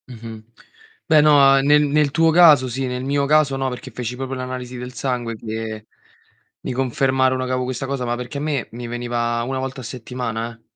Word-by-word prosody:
Mh-mh. 115 -3 -9 0.6
Beh, 155 -3 +5
no, 150 0 +5 0.3
uhm, 135 - +1
nel 150 +1 +5
nel 145 0 +2
tuo 165 +2 +3
caso 155 -6 +6
sì, 130 +2 -3
nel 125 0 -4
mio 140 +1 0
caso 150 -1 +3
no, 135 0 -1
perché 125 +1 -8
feci 125 +1 -5
proprio 135 +1 -5
l'analisi 130 -1 -6
del 125 +1 -7
sangue, 125 -3 -3
che 110 0 -6 0.7
mi - - -4
confermarono 130 0 +1
che 130 - -4
avevo 130 0 -1
questa 130 +1 -4
cosa, 135 -2 -3
ma 120 0 -1
perché 125 +3 -6
a - - -5
me 145 -5 -2
mi 120 +1 -7
veniva 120 0 -2
1 130 +1 -3
volta 130 0 -5
a - - -10
settimana, 120 -1 -5
eh. - - -34
130 Hz, 205 wpm, -21 LUFS, 120-135 Hz, 0.7 s, caso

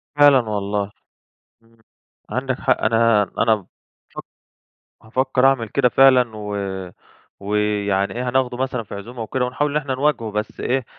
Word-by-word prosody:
فعلًا 145 -2 +6
والله، 100 0 -2 0.7
امم، 115 0 -28 0.5
عندك 130 0 -2
حق 130 - +1
أنا 115 -1 +3 0.2
أنا 115 -1 +4
بافك 100 -4 -9 1.4
هافكّر 130 +3 0
أعمل 130 -5 +2
كده 130 +1 +2
فعلًا، 130 -2 +5
و 105 -1 -4 0.8
ويعني 100 -1 -1
إيه 125 +1 -2
هناخدُه 125 -1 0
مثلًا 130 -2 -2
في 100 - -9
عزومة 115 +4 -8
وكده، 125 +3 -1
ونحاول 130 +4 -1
إن 150 - 0
إحنا 135 -3 -2
نواجهُه 130 -5 0
بس 105 +1 -4
إيه، 130 0 -1
120 Hz, 140 wpm, -21 LUFS, 105-130 Hz, 1.4 s, فعلًا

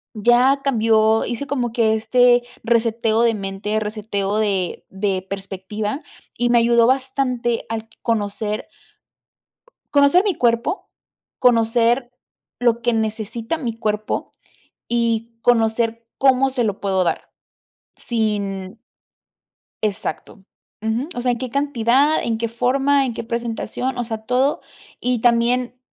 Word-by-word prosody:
ya 245 +5 +4
cambió 220 -3 +3
hice 245 +4 -4
como 250 -3 -1
que 220 -2 +2
este 245 +2 +4 0.2
reseteo 230 -1 +2
de 230 -1 +3
mente, 205 +1 -3
reseteo 210 -1 -2
de 195 -5 -1
de 190 -1 -2
perspectiva, 200 - -5 0.3
y 240 +1 +1
me 240 0 +5
ayudó 235 0 +4
bastante 260 -3 0
al 225 0 -4
conocer 210 -1 -2 1.3
conocer 285 +7 +5
mi 400 - +1
cuerpo. 235 - 0 0.5
Conocer 240 +1 +3 0.5
lo 235 -1 +2
que 240 +1 +2
necesita 225 +4 -2
mi 250 -7 -3
cuerpo 215 -1 -2 0.6
y 230 -1 -1
conocer 230 -1 +2
cómo 270 0 +4
se 255 -2 0
lo 205 -2 -2
puedo 190 -2 +1
dar - - -2 0.7
sin 200 -4 -2 1.0
exacto, 210 -1 -4 0.4
ujú. 220 +5 -1
O 245 - -3
sea, 250 0 +1
en 235 - -4
qué 255 +1 -5
cantidad, 280 +1 +2
en 225 -1 -1
qué 230 - 0
forma, 270 +4 +2
en 245 - -3
qué 225 - -5
presentación. 235 +2 -3
O - - 0
sea, 220 -2 -6
todo 255 +4 +1 0.4
y 250 -1 0
también 245 +1 +2
230 Hz, 125 wpm, -21 LUFS, 215-245 Hz, 1.3 s, me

